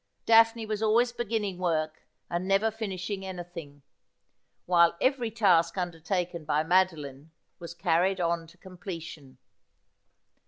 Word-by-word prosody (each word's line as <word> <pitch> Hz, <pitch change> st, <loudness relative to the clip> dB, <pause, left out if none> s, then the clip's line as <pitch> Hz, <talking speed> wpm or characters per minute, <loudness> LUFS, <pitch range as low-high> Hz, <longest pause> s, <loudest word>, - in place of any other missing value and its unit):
Daphne 225 Hz, 0 st, +5 dB
was 215 Hz, -1 st, -3 dB
always 230 Hz, +3 st, +3 dB
beginning 220 Hz, -5 st, -3 dB
work, 155 Hz, -3 st, -2 dB, 0.2 s
and 175 Hz, +2 st, -3 dB
never 195 Hz, +3 st, +2 dB
finishing 195 Hz, -2 st, -5 dB
any 185 Hz, -2 st, -6 dB
thing; 150 Hz, -5 st, -11 dB, 0.8 s
while 170 Hz, -1 st, +4 dB
every 255 Hz, -3 st, +1 dB
task 185 Hz, -6 st, +2 dB
undertaken 175 Hz, 0 st, -3 dB
by 150 Hz, 0 st, 0 dB
Madoline 160 Hz, -5 st, 0 dB, 0.3 s
was 170 Hz, 0 st, -9 dB
carried 175 Hz, +2 st, +1 dB
on 170 Hz, -1 st, -1 dB
to 165 Hz, -, -19 dB
completion. 170 Hz, -8 st, -9 dB
180 Hz, 120 wpm, -28 LUFS, 165-205 Hz, 0.8 s, Daphne